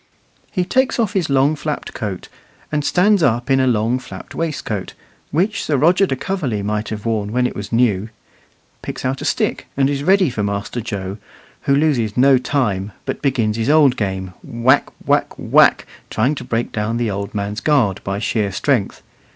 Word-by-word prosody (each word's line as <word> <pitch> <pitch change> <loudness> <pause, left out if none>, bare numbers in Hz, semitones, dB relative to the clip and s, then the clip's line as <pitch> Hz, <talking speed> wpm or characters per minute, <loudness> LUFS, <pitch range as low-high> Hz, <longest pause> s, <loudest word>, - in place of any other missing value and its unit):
He 180 -3 0
takes 260 +6 +1
off 220 -4 0
his 185 -7 0
long 140 +2 +3
flapped 150 0 -4
coat, 100 -6 -5 0.4
and 150 -1 0
stands 195 +5 +3
up 120 -2 +1
in 135 - +4
a 130 - +3
long 115 +1 +1
flapped - - -10
waistcoat, 145 - -3 0.3
which 190 +9 0
Sir 145 - +1
Roger 180 +7 +4
de 135 - -1
Coverley 135 - -2
might 105 +1 -2
have 105 -1 -6
worn 105 -3 -1
when 125 +2 +1
it - - -2
was 100 0 -6
new, 115 -3 +2 0.7
picks - - -6
out 130 +1 -1
a - - -4
stick, - - -1
and 135 0 +3
is 140 -1 -2
ready 185 -3 +4
for 110 - -3
Master 100 +4 -2
Joe, 100 -3 -5 0.5
who 140 - +5
loses 135 -8 +1
no 130 0 +5
time, 105 -8 -1
but - - -4
begins 115 -6 0
his 115 +3 -1
old 145 -4 +5
game, 95 -5 -3
whack, 125 -1 +2 0.2
whack, - - +1
whack, - - +4 0.2
trying 125 +7 +1
to 150 - -6
break 115 +1 -2
down 110 +2 -2
the 120 -3 0
old 100 +1 -5
man's 100 +1 -2
guard 130 - +2
by 100 0 -2
sheer 105 -1 -1
strength. 120 +1 0
125 Hz, 185 wpm, -19 LUFS, 105-145 Hz, 0.7 s, who